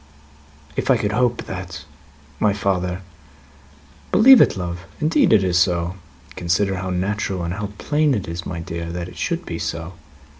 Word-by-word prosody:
"If -, -, -2 dB
I -, -, +6 dB
could 105 Hz, -, -1 dB
hope 120 Hz, +2 st, +1 dB
that, 90 Hz, -2 st, -7 dB, 0.5 s
my 105 Hz, -2 st, +3 dB
father! 95 Hz, -3 st, -1 dB, 0.5 s
" -, -, -27 dB
"Believe 255 Hz, +3 st, +8 dB
it, -, -, +3 dB
love! 85 Hz, -1 st, -5 dB
Indeed 155 Hz, +2 st, +3 dB
it 105 Hz, -3 st, +5 dB
is 90 Hz, -2 st, +2 dB
so. 85 Hz, -1 st, +1 dB, 0.4 s
Consider 95 Hz, +3 st, 0 dB
how 95 Hz, 0 st, -4 dB
natural 95 Hz, 0 st, -1 dB
and 85 Hz, +1 st, -2 dB
how 105 Hz, +2 st, -3 dB
plain 150 Hz, -2 st, +1 dB
it 100 Hz, -, -3 dB
is, 85 Hz, +1 st, -5 dB
my 85 Hz, -2 st, -5 dB
dear, 85 Hz, 0 st, -5 dB
that 85 Hz, 0 st, -5 dB
it -, -, -14 dB
should -, -, -2 dB
be -, -, -5 dB
so. 85 Hz, +2 st, -4 dB
95 Hz, 175 wpm, -21 LUFS, 85-105 Hz, 0.5 s, Believe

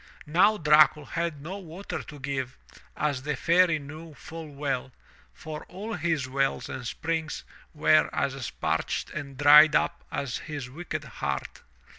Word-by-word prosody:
Now 185 Hz, +8 st, +4 dB
Dracul 150 Hz, -2 st, +5 dB
had 165 Hz, -4 st, -3 dB
no 190 Hz, +6 st, -5 dB
water 180 Hz, +2 st, -6 dB
to 145 Hz, -, -11 dB
give, 130 Hz, -2 st, -3 dB, 0.4 s
as 145 Hz, -4 st, 0 dB
the 150 Hz, +2 st, -2 dB
Fairy 170 Hz, +4 st, +4 dB
knew 155 Hz, +2 st, -10 dB
full 160 Hz, 0 st, -9 dB
well, 140 Hz, -3 st, -3 dB, 0.4 s
for 155 Hz, -1 st, -8 dB
all 205 Hz, +5 st, -6 dB
his 160 Hz, -6 st, -1 dB
wells 135 Hz, +1 st, -1 dB
and 125 Hz, -, -5 dB
springs 160 Hz, +3 st, -3 dB, 0.3 s
were 155 Hz, +1 st, +4 dB
as 135 Hz, -4 st, -2 dB
parched -, -, -2 dB
and 140 Hz, -3 st, -6 dB
dried 150 Hz, +2 st, +8 dB
up -, -, +1 dB
as 135 Hz, -3 st, -2 dB
his 145 Hz, -5 st, -6 dB
wicked 155 Hz, 0 st, -5 dB
heart. 70 Hz, -, -4 dB
150 Hz, 145 wpm, -27 LUFS, 140-165 Hz, 0.4 s, dried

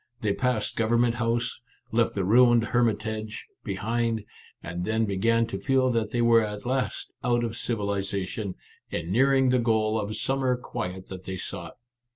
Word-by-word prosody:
They 105 Hz, -2 st, +1 dB
passed 125 Hz, -3 st, 0 dB
Government 115 Hz, +1 st, +3 dB
House, 115 Hz, 0 st, -1 dB, 0.3 s
left 115 Hz, 0 st, +2 dB
the 100 Hz, -, 0 dB
ruined 120 Hz, +2 st, +6 dB
Hermitage 110 Hz, -2 st, -1 dB, 0.2 s
behind, 115 Hz, +2 st, -1 dB, 0.4 s
and 85 Hz, +2 st, -4 dB
then 110 Hz, +3 st, +1 dB
began 115 Hz, +4 st, +2 dB
to 95 Hz, -3 st, -5 dB
feel 130 Hz, +5 st, +2 dB
that 115 Hz, -2 st, 0 dB
they 120 Hz, +1 st, 0 dB
were 115 Hz, -1 st, +6 dB
at 105 Hz, -1 st, -4 dB
last 130 Hz, +1 st, -2 dB
out 120 Hz, -1 st, +2 dB
of 115 Hz, -1 st, -2 dB
civilization, 100 Hz, -3 st, -2 dB, 0.4 s
and 85 Hz, +1 st, -3 dB
near 135 Hz, +7 st, +4 dB
ing 135 Hz, -1 st, +4 dB
the 125 Hz, 0 st, +3 dB
goal 110 Hz, -2 st, +2 dB
of 105 Hz, 0 st, -3 dB
summer 135 Hz, -2 st, +1 dB
quiet 95 Hz, -7 st, -5 dB
that 95 Hz, -1 st, -8 dB
they 95 Hz, 0 st, -4 dB
sought. -, -, -6 dB
115 Hz, 165 wpm, -27 LUFS, 100-120 Hz, 0.4 s, ruined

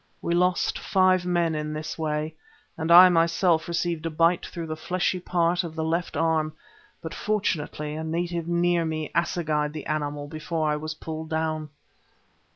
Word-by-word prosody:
We 170 Hz, -, -2 dB
lost 180 Hz, +1 st, +1 dB
five 185 Hz, -1 st, +2 dB
men 170 Hz, -2 st, +1 dB
in 150 Hz, 0 st, -3 dB
this 155 Hz, 0 st, -5 dB
way, 155 Hz, 0 st, -2 dB, 0.4 s
and 160 Hz, +1 st, -2 dB
I 180 Hz, +2 st, +11 dB
myself 170 Hz, 0 st, +2 dB
received 170 Hz, -1 st, -1 dB
a -, -, -1 dB
bite 165 Hz, +2 st, +2 dB
through 170 Hz, -1 st, -6 dB
the 155 Hz, 0 st, -4 dB
fleshy 180 Hz, +2 st, -1 dB
part 175 Hz, 0 st, +1 dB
of 165 Hz, -2 st, -7 dB
the 160 Hz, -, -2 dB
left 165 Hz, +2 st, -1 dB
arm, 160 Hz, -1 st, +1 dB, 0.5 s
but 160 Hz, -, -5 dB
fortunately 160 Hz, -8 st, -2 dB
a 155 Hz, +1 st, -4 dB
native 170 Hz, +1 st, -2 dB
near 175 Hz, 0 st, +2 dB
me 155 Hz, -1 st, -3 dB
assegaied 155 Hz, -4 st, 0 dB
the 155 Hz, -2 st, -6 dB
animal 145 Hz, -1 st, -3 dB
before 155 Hz, +1 st, -2 dB
I -, -, +1 dB
was 155 Hz, +1 st, -5 dB
pulled 160 Hz, 0 st, -6 dB
down. 160 Hz, -1 st, -2 dB
160 Hz, 165 wpm, -25 LUFS, 155-175 Hz, 0.5 s, I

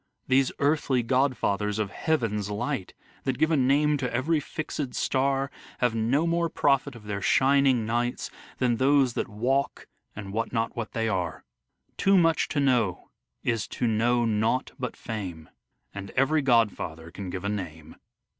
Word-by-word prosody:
These 130 Hz, 0 st, +3 dB
earthly 140 Hz, -4 st, +1 dB
godfathers 115 Hz, -5 st, +1 dB
of 105 Hz, -2 st, -2 dB
heaven's 110 Hz, -10 st, -1 dB
light 105 Hz, 0 st, -3 dB, 0.3 s
That 130 Hz, -2 st, -1 dB
give 160 Hz, +2 st, +2 dB
a -, -, +4 dB
name 145 Hz, +2 st, +3 dB
to 125 Hz, -3 st, -2 dB
every 150 Hz, +6 st, +1 dB
fixed 145 Hz, -3 st, -5 dB
star, 135 Hz, +1 st, 0 dB, 0.3 s
Have 125 Hz, -2 st, +1 dB
no 120 Hz, +8 st, +1 dB
more 170 Hz, 0 st, +1 dB
profit 140 Hz, -3 st, +1 dB
of 115 Hz, -, -12 dB
their 100 Hz, -1 st, -4 dB
shining 135 Hz, -2 st, +3 dB
nights 120 Hz, +2 st, -1 dB, 0.3 s
Than 120 Hz, -2 st, +1 dB
those 135 Hz, -1 st, +3 dB
that -, -, -2 dB
walk 125 Hz, +6 st, -1 dB, 0.3 s
and 100 Hz, -1 st, -7 dB
wot 115 Hz, +1 st, -1 dB
not 115 Hz, -1 st, -1 dB
what 115 Hz, -2 st, -5 dB
they 115 Hz, -1 st, 0 dB
are. 90 Hz, -5 st, -2 dB, 0.5 s
Too 195 Hz, 0 st, +4 dB
much 165 Hz, -2 st, +3 dB
to 150 Hz, -, -1 dB
know 120 Hz, -10 st, +1 dB, 0.3 s
is 115 Hz, -3 st, 0 dB
to -, -, -3 dB
know 120 Hz, +2 st, +2 dB
nought 110 Hz, +3 st, 0 dB
but 125 Hz, -2 st, -4 dB
fame, 95 Hz, -8 st, -6 dB, 0.4 s
And 100 Hz, 0 st, -7 dB
every 145 Hz, +4 st, +3 dB
godfather 105 Hz, -, +1 dB
can 95 Hz, 0 st, -7 dB
give 90 Hz, +1 st, -5 dB
a -, -, -1 dB
name. 80 Hz, -6 st, -6 dB
120 Hz, 160 wpm, -27 LUFS, 105-140 Hz, 0.5 s, a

